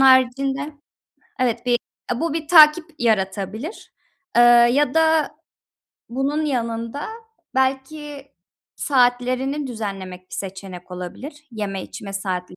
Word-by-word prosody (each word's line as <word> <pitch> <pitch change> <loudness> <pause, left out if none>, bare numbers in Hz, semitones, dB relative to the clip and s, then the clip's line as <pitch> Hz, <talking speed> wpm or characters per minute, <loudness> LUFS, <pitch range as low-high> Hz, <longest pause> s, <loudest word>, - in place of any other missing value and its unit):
haricinde, 270 +2 +4 0.7
evet, 240 -1 0
bir, 250 - +1 0.4
eee, 240 - -1
bu 330 -2 0
bir 320 -1 -3
takip 310 0 +8
yaratabilir, 215 - -2 0.4
eee, - - +8 0.3
ya 285 -1 +2
da 320 -1 +3 0.8
bunun 275 +5 -1
yanında, 230 0 -2 0.5
belki 275 +2 -2 0.4
saatlerini 255 +2 +1
düzenlemek 195 -6 -5
bir - - -7
seçenek 190 -2 -7
olabilir, 275 - -8
yeme 205 -4 -4
içme 195 -1 -8
saatleri. 185 -2 -4
255 Hz, 105 wpm, -22 LUFS, 205-290 Hz, 0.8 s, takip